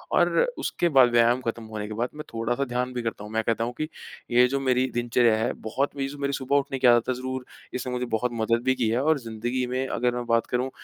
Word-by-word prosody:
और - - +4 0.3
उसके 175 - 0
बाद 130 -5 +6
व्यायाम 120 +1 +4
ख़त्म 115 0 -2
होने 110 -1 -5
के 110 - -6
बाद 120 +3 -1
मैं 150 - -6
थोड़ा 115 +1 -1
सा 140 - 0
ध्यान 125 0 -2
भी 125 - -2
करता 115 -3 -4
हूँ। 105 - -9
मैं 110 0 +1
कहता 115 0 0
हूँ 120 +1 -3
कि 155 - -2 0.4
ये 125 +1 +6
जो 140 +2 -1
मेरी 130 -1 +2
दिनचर्या 120 -1 +3
है, 110 +2 0
बहुत 130 +7 -2
मेर 135 -1 -2
सु 145 - -9
मेरी 140 0 -1
जो - - 0
सुबह 135 +1 -1
उठने 140 -1 0
आदत 120 0 +5
है, - - +2
ज़रूर 130 0 -5 0.3
इसने 125 0 -3
मुझे 125 0 -1
बहुत 120 +1 -1
मदद 115 0 +1
भी 130 0 +2
की 115 -3 0
है 120 +3 +1
और 155 +1 +2
ज़िंदगी 120 +2 -3
में 130 +1 -1
अगर 125 -1 0
मैं 120 0 -3
बात 115 -1 +2
करूँ, 125 +2 -1
125 Hz, 265 wpm, -26 LUFS, 115-130 Hz, 0.4 s, बाद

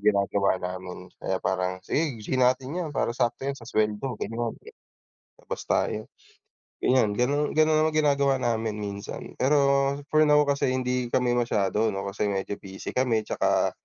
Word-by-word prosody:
ginagawa 100 -1 +2
namin 90 0 -7
kaya 95 - -1
parang 95 0 0
sige, 150 -6 0
g 130 - 0
natin 130 +2 +2
yan 175 -2 -2
para 135 -4 -1
sakto 120 +1 -1
yan 140 - 0
sa 115 -4 -11
sweldo 110 +2 0
ganun. 115 +1 -3 0.9
Labas - - -5
tayo, 110 0 0 0.8
ganyan 125 -5 +3
ganun 145 +6 +1
ganun 155 0 +4
naman 160 - -1
ginagawa 140 -3 +3
namin 110 -2 -1
minsan, 100 0 -7
pero 140 0 +3 0.2
for 155 0 +5
now 150 0 +6
kasi 140 -2 +1
hindi 125 -1 0
kami 125 +1 +1
masyado 105 -2 +1
ano 95 - -3
kasi 105 +1 -2
medyo 100 0 -2
busy 95 0 -8
kami, 120 -4 +1
tsaka, - - +1
120 Hz, 155 wpm, -26 LUFS, 105-140 Hz, 0.9 s, now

